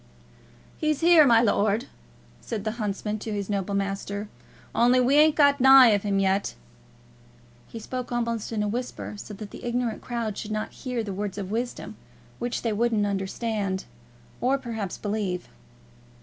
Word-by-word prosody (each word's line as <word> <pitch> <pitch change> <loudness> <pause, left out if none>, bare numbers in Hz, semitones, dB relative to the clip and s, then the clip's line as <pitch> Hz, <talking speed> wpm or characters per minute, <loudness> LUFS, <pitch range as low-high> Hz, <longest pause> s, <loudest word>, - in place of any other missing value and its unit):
"He's 305 -1 0
here, 330 -3 +7
my 230 -1 +5
lord," 215 +2 +2 0.5
said 220 -4 -5
the 215 - -1
huntsman 210 +1 -2
to 220 - -5
his 205 0 -3
noble 200 0 -1
master, 200 +1 -3 0.4
"only 245 +2 +4
we 250 +2 +3
ain't 300 +1 +6
got 285 -2 +4
nigh 265 -4 +8
him 200 0 -1
yet." 195 0 +1 1.1
He - - -9
spoke 250 +3 -5
almost 235 -2 -2
in 215 -2 -1
a - - -1
whisper, 245 +2 -4
so 205 0 -8
that 205 0 -9
the - - -10
ignorant 240 -2 -2
crowd 230 -4 -3
should 215 - -6
not 215 0 -3
hear 250 -4 -4
the 200 -2 -5
words 200 0 -4
of 195 -1 -5
wisdom, 240 +3 -4 0.4
which 240 0 -3
they 230 -2 0
wouldn't 220 -1 +1
understand 200 0 -2 0.6
or 260 +3 +2
perhaps 225 -7 -5
believe. 200 -4 -3
220 Hz, 160 wpm, -26 LUFS, 205-245 Hz, 1.1 s, nigh